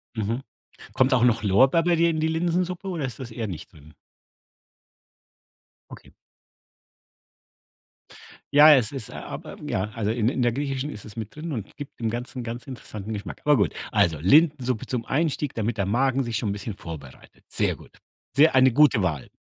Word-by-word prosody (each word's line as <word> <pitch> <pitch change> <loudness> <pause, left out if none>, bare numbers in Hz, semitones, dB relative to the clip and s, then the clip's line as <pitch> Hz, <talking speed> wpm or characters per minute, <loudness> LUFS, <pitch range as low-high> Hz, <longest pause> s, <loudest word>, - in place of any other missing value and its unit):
Mhm. 115 +4 -2 0.5
Kommt 130 +1 +3
auch 120 -2 +3
noch 120 -3 +3
Lorbeer 130 - +4
bei 175 -1 +3
dir 170 +1 +3
in 155 -1 -1
die 160 - +1
Linsensuppe 175 +3 -1
oder 165 -7 -2
ist 130 - -7
das 120 -3 -7
eher 110 -1 -4
nicht 90 +2 -8
drin? 75 -2 -17 2.0
Okay. - - -13 2.4
Ja, 150 +1 +9
es 125 -2 +1
ist 130 -6 -6
aber, - - -8
ja, 95 +3 -1
also, 110 -2 -2
in 115 0 +1
in 130 - -2
der 120 -1 +2
Griechischen 140 +1 -3
ist 105 - -9
es 105 +1 -12
mit 110 +3 -6
drin 160 +1 -6
und 110 -7 -6
gibt 145 -3 -10
dem 115 -1 -1
Ganzen 120 +2 -5
ganz 120 +1 -6
interessanten 110 -5 -8
Geschmack. 105 - -7
Aber 150 -2 +4
gut, 100 - +1 0.2
also, 90 -8 +2
Linsensuppe 130 - +3
zum 120 -3 -3
Einstieg, 150 -1 -1
damit 115 0 -2
der 100 - 0
Magen 130 +5 +1
sich 115 -2 -2
schon 110 - -2
'n - - 0
bisschen 100 +1 -5
vorbereitet. 80 -7 -11
Sehr - - 0
gut. - - -17 0.4
Sehr 155 -1 +6
eine 130 -1 +6
gute 140 -5 +4
Wahl. 75 -8 -2
120 Hz, 180 wpm, -25 LUFS, 105-145 Hz, 2.4 s, Ja